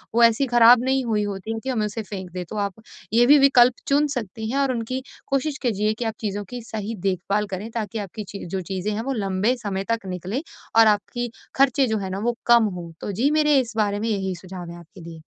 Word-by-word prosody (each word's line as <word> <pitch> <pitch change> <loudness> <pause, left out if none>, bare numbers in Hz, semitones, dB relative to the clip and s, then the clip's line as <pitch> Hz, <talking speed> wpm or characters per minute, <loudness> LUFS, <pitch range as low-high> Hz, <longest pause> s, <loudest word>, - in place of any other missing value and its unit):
वो 235 - +5
ऐसी 230 +4 +5
खराब 240 0 +7
नहीं 265 0 +1
हुई 215 -3 +1
होती 205 +2 -4
है 225 - -4
कि 265 - -3
हमें 220 -5 0
उसे 210 +2 -4
फेंक 190 -3 -7
दें। 180 0 -4
तो - - -6
आप 200 -2 -1 0.4
ये 235 +2 +6
भी 290 +4 +7
विकल्प 255 -3 +6
चुन 290 +2 +3
सकती 220 -1 -4
हैं, 270 - -1
और 275 -2 +2
उनकी 250 +3 -3 0.2
कोशिश 275 +1 -1
कीजिए 215 -3 +1
कि 230 +2 -5
आप 225 - -1
चीज़ों 205 -1 -2
की 245 -1 -6
सही 220 +1 -4
देखभाल 195 +3 0
करें, 195 +3 -5
ताकि 220 -1 -3
आपकी 205 +2 -6
चीज़ 200 -3 -7
जो 190 0 -2
चीज़ें 190 +2 -2
हैं 215 - -2
वो - - 0
लंबे 195 +6 +1
समय 195 -2 -2
तक 230 -3 -1
निकलें 185 - -3 0.4
और 225 - +8
आपकी 235 +3 0 0.2
खर्चे 270 -1 +3
जो 220 -1 0
हैं 190 -2 -4
ना, 195 - -3
वो 235 +2 -1
कम 235 -1 +6
हों। 170 -1 -8
तो 205 - -3
जी 235 +9 +1
मेरे, 300 -2 +4
इस 240 -2 -3
बारे 205 -1 +1
में 225 +1 -1
यही 190 -3 -1
सुझाव 180 -1 -9
हैं 170 - -9
आपके 175 +3 -15
लिए। 165 -1 -10
220 Hz, 240 wpm, -23 LUFS, 195-245 Hz, 0.4 s, और